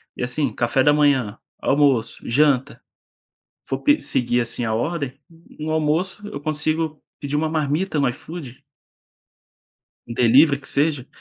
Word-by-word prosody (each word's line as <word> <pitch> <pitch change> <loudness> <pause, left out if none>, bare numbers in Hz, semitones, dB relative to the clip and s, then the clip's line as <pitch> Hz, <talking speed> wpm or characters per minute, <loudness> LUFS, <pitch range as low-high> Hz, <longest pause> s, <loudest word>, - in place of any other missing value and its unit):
E - - -4
assim, 125 0 -1
café 120 +4 +1
da 145 - +5
manhã, 140 -8 +2 0.2
almoço, 135 -5 +2
janta, 140 +1 +2 0.8
for - - -3
pe 295 +1 +4
seguir, 120 0 0
assim, 120 0 -1
a 110 -1 -1
ordem, 140 +2 -2 0.4
no 155 +1 -4
almoço 160 +6 -1
eu 140 - -7
consigo 155 +1 -2 0.2
pedir 145 0 -2
uma 155 +1 0
marmita 155 +2 -1
no 140 - +3
iFood. 135 0 -8 1.4
Um 115 - -6
delivery 135 +5 +5
que 135 - -13
seja. 145 -3 0
145 Hz, 140 wpm, -22 LUFS, 125-155 Hz, 1.4 s, da